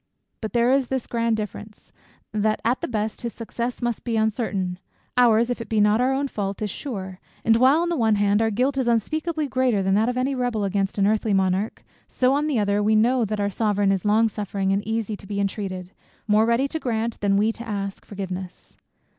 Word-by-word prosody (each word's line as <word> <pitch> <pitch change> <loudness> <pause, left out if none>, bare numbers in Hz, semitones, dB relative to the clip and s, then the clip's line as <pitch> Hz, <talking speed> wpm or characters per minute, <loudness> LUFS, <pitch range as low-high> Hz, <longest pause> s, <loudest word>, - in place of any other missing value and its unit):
But 220 - -5
there 240 +1 +3
is 270 -1 +2
this 265 -1 -2
grand 230 -1 0
difference 210 0 -7 0.4
that 215 0 0
at 245 +2 +1
the - - -2
best, 215 -2 -3
his 235 -1 -4
success 235 +2 -4
must 240 -2 -1
be 230 -2 -1
uncertain, 205 -5 -1 0.4
ours, 235 -1 +4
if 245 - -3
it 230 - -8
be 220 - +1
not 210 +2 +4
our 255 +1 +2
own 275 +1 0
fault, 200 -5 -4
is 210 - -2
sure; 190 -9 -6 0.3
and 225 - +5
while, 265 +6 +5
on 345 - 0
the 345 - 0
one 225 -6 +3
hand, 205 +1 +2
our 225 - +2
guilt 260 +6 0
is 255 - 0
unspeakably 310 +7 0
greater 255 -6 +1
than 190 0 +1
that 220 +4 +3
of 250 - -2
any 260 +2 0
rebel 245 -5 -1
against 195 0 -1
an 200 - +3
earthly 215 0 +2
monarch; 190 +2 0 0.2
so, 255 +1 +2
on 295 +2 +1
the 290 -5 0
other, 205 -1 +1
we 215 +1 +3
know 235 +2 +3
that 215 0 -3
our 200 0 0
Sovereign 205 -1 +1
is 195 -2 0
"Long 215 +2 +4
suffering, 200 -2 -2
and 200 - +1
easy 220 -1 -1
to 195 - -13
be 200 0 -3
intreated;" 190 -2 -3 0.4
more 215 +1 +4
ready 235 +4 +2
to 320 - -3
grant, 230 -3 -2
than 200 -1 +2
we 215 +2 +3
to 235 +1 -9
ask, 200 -2 -4
forgiveness. 190 -2 -7
220 Hz, 220 wpm, -24 LUFS, 200-245 Hz, 0.4 s, and